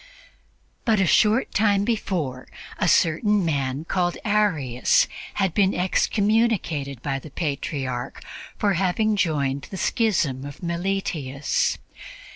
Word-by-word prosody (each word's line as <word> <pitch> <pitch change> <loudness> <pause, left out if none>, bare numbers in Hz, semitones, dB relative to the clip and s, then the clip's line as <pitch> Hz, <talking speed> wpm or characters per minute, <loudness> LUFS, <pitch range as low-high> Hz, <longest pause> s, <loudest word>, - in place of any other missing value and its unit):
But 220 -4 +2
a 190 - +3
short 215 +7 +3
time 205 -1 +2
before, 170 - -2 0.3
a - - +1
certain 195 +4 +3
man 140 -1 -1
called 175 0 0
Arius 175 - +2 0.3
had 190 -4 0
been 195 0 +2
excommunicated 185 - 0
by 135 -1 -2
the 155 - -11
Patriarch 135 -4 -4 0.3
for 205 -2 +2
having 195 +4 +1
joined 140 -7 0
the 190 - -6
schism 175 - 0
of 145 +4 -9
Meletius. 170 -6 -1
175 Hz, 110 wpm, -24 LUFS, 140-205 Hz, 0.3 s, a